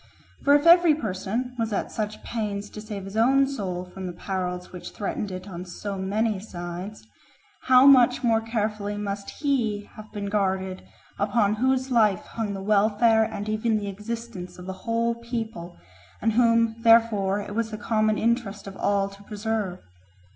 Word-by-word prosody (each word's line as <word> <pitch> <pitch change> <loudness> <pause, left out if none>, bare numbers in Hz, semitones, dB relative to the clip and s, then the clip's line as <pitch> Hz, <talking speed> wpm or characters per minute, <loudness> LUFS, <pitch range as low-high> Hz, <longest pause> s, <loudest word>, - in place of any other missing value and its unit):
For 285 +1 +6
if 290 +2 +2
every 340 -2 +7
person 225 +1 -3
was 225 -1 -1
at 205 - -2
such 210 -1 -4
pains 205 -3 -4
to 210 - -8
save 210 -3 -6
his 195 +1 -8
own 265 +5 +4
soul 190 -10 -4
from 185 +1 -7
the 175 - -5
perils 180 0 -4
which 180 - -9
threatened 205 0 -3
it 185 +1 -7
on 180 -2 -6
so 195 +3 -6
many 205 +2 0
sides, 180 +1 -7 0.6
how 255 0 +7
much 255 -3 +6
more 225 -2 +3
carefully 210 -2 -2
must 200 -1 -4
he 235 -8 -1
have 215 0 -11
been 205 -2 -5
guarded 190 -2 -1 0.4
upon 205 0 +2
whose 260 +3 +1
life 215 -6 +3
hung 215 -3 -4
the 190 - -6
welfare 215 +2 +4
and 215 -2 -5
even 215 +1 +1
the 205 -1 -3
existence 210 -2 -6
of 180 - -10
the 190 - -4
whole 230 +4 -1
people, 225 -7 -5 0.4
and 225 0 +1
whom 230 -1 +3
therefore 225 -4 +4
it 205 0 -6
was 225 +1 -1
the 215 - -5
common 215 0 +1
interest 230 -3 -1
of 195 -1 -8
all 200 -1 +1
to 200 0 -13
preserve? 210 -2 -3
210 Hz, 170 wpm, -25 LUFS, 195-230 Hz, 0.6 s, every